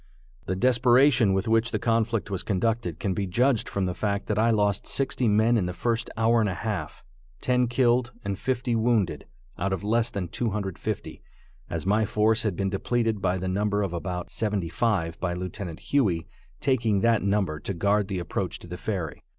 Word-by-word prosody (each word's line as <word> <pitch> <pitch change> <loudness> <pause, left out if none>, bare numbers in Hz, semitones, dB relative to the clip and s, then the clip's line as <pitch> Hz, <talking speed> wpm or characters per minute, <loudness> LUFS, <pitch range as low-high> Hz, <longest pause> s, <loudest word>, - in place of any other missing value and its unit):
The 95 - 0
desperation 125 +1 +4
with 95 +3 0
which 115 +1 +3
the - - -1
conflict 115 -2 0
was 95 -2 0
conducted 105 -4 -1
can 100 - -1
be 100 +1 -2
judged 120 +5 +1
from 100 -1 -1
the 90 - -1
fact 100 +1 -2
that 105 0 -1
I 115 +2 +4
lost 105 -3 +1
sixty 130 -2 0
men 110 +3 +4
in 90 - -1
the 90 - -3
first 115 +5 -1
hour 115 +1 +3
and 105 -2 +2
a 90 - -3
half, 105 0 -4 0.4
ten 125 -1 +2
killed 120 0 +2
and 100 0 -2
fifty 125 -2 -1
wounded, 115 -4 +1 0.3
out 95 +2 0
of 95 - -2
less 115 +2 +1
than 100 -5 -4
250, 105 -4 -3 0.5
as 85 0 -3
my 105 +3 +3
force 110 +2 +2
had 105 -5 -1
been 95 +1 -1
depleted 115 +1 0
by 90 0 +1
the 95 0 -3
number 100 +2 0
of 95 -3 -3
about 90 +1 -4
seventy 105 -6 -1
five 85 -5 0
by 90 -1 -1
Lieutenant 90 -1 -5
Huey 95 -13 +1 0.3
taking 115 -7 +1
that 115 -2 +3
number 100 -6 0
to 100 - -4
guard 100 +3 +2
the 95 -2 -3
approach 90 +1 -3
to - - -12
the 90 +1 -7
ferry. 90 -8 -3
105 Hz, 190 wpm, -26 LUFS, 95-115 Hz, 0.5 s, desperation